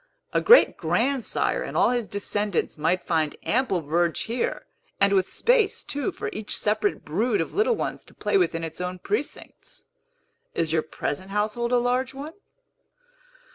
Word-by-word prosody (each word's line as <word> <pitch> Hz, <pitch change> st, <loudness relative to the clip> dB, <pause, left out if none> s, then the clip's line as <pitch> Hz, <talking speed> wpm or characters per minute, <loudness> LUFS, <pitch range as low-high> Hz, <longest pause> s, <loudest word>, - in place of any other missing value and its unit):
A -, -, +2 dB
great 485 Hz, -, +7 dB
grandsire 260 Hz, 0 st, 0 dB
and -, -, -4 dB
all -, -, +4 dB
his 240 Hz, -3 st, -1 dB
descendants 205 Hz, -1 st, -1 dB
might 165 Hz, +4 st, 0 dB
find 160 Hz, -3 st, 0 dB
ample 235 Hz, -8 st, +1 dB
verge 165 Hz, +3 st, 0 dB
here, 235 Hz, +2 st, -2 dB, 0.3 s
and 200 Hz, 0 st, +4 dB
with 190 Hz, -2 st, +2 dB
space, 465 Hz, -4 st, +2 dB
too, 290 Hz, +6 st, -2 dB
for -, -, -5 dB
each 215 Hz, -1 st, -3 dB
separate 210 Hz, 0 st, 0 dB
brood 210 Hz, +8 st, 0 dB
of 165 Hz, -, -2 dB
little 450 Hz, +4 st, +2 dB
ones -, -, -4 dB
to -, -, -20 dB
play -, -, -1 dB
within 175 Hz, -, +2 dB
its 160 Hz, +2 st, -6 dB
own 180 Hz, 0 st, -3 dB
precincts. 415 Hz, -, -5 dB, 0.7 s
Is 160 Hz, -1 st, 0 dB
your 160 Hz, -, +3 dB
present 175 Hz, +3 st, -4 dB
household 215 Hz, +4 st, -1 dB
a 250 Hz, -, +4 dB
large 250 Hz, +2 st, 0 dB
one?" 290 Hz, +4 st, -7 dB
210 Hz, 160 wpm, -25 LUFS, 175-260 Hz, 0.7 s, great